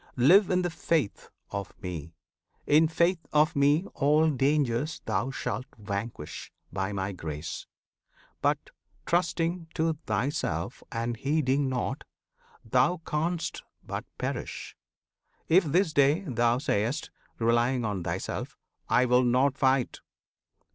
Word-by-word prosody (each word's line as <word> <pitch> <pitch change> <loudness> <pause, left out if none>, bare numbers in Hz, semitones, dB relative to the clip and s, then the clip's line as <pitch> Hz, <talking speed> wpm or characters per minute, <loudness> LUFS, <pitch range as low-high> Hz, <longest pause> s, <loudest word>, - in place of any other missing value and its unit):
Live 175 - +6
in 180 -1 +2
the 175 - -1
faith 160 -9 -1 0.2
of 100 -1 -5
Me! 80 -3 -6 0.5
In 155 +2 +5
faith 170 +2 +2
of 150 +1 +3
Me 145 +5 +3
All 150 +2 +3
dangers 140 0 +1
thou 110 +8 0
shalt 130 0 -3
vanquish, 100 -5 -5 0.2
by 95 +1 -1
My 95 0 -2
grace; 80 -3 -6 0.7
But, - - 0 0.3
trusting 170 0 0
to 160 0 +2
thyself 115 +8 -1
and 115 0 -2
heeding 140 0 +1
not, 130 +2 -2 0.6
Thou 175 0 +2
can'st 165 +3 -1 0.2
but - - -5
perish! - - -4 0.7
If 180 +2 +5
this 165 +2 +2
day 145 +4 +4
thou 120 -8 +1
say'st, 125 +1 -1 0.3
Relying 120 +2 +2
on 100 -4 -2
thyself, - - -4 0.3
"I 125 - +4
will 125 0 +4
not 130 +3 +3
fight!" 135 -3 +1
135 Hz, 120 wpm, -28 LUFS, 115-160 Hz, 0.7 s, Live